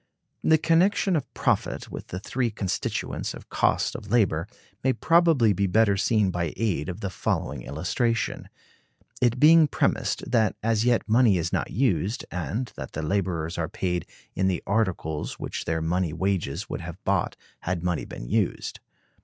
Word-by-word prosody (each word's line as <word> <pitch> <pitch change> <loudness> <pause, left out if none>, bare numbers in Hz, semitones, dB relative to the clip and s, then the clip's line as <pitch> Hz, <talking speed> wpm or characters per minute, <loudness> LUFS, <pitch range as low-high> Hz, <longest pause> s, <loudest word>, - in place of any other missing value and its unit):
The 160 - +5
connection 180 +4 +3
of 150 - -2
profit - - 0
with - - -7
the 90 - -5
three 120 +4 -1
constituents 100 -3 -3
of - - -13
cost - - +1
of 105 - -8
labor 100 -7 +2 0.4
may 130 0 +3
probably 165 -11 +4
be 100 +1 +1
better 100 +1 +3
seen 100 -1 +2
by 85 -3 -2
aid 100 -7 -1
of 90 +4 -6
the 100 - -3
following 70 -7 -2
illustration; 90 - -1 0.7
it 120 0 +2
being 160 +2 +7
premised - - -1
that 110 -3 +3
as 115 0 +2
yet 120 -2 +2
money 115 -3 +4
is 85 0 -2
not - - 0
used, 105 - 0
and 100 - -3
that - - -7
the 80 - -3
laborers 85 -2 -1
are 80 -1 -1
paid 90 -1 -2 0.3
in 95 - +1
the 90 -2 -1
articles 95 -8 -1
which - - -5
their 80 -1 -1
money 85 0 0
wages 95 -5 -1
would - - -5
have - - -7
bought - - 0 0.2
had 90 -1 -3
money 90 -3 0
been - - -8
used. - - -1
100 Hz, 165 wpm, -26 LUFS, 85-120 Hz, 0.7 s, being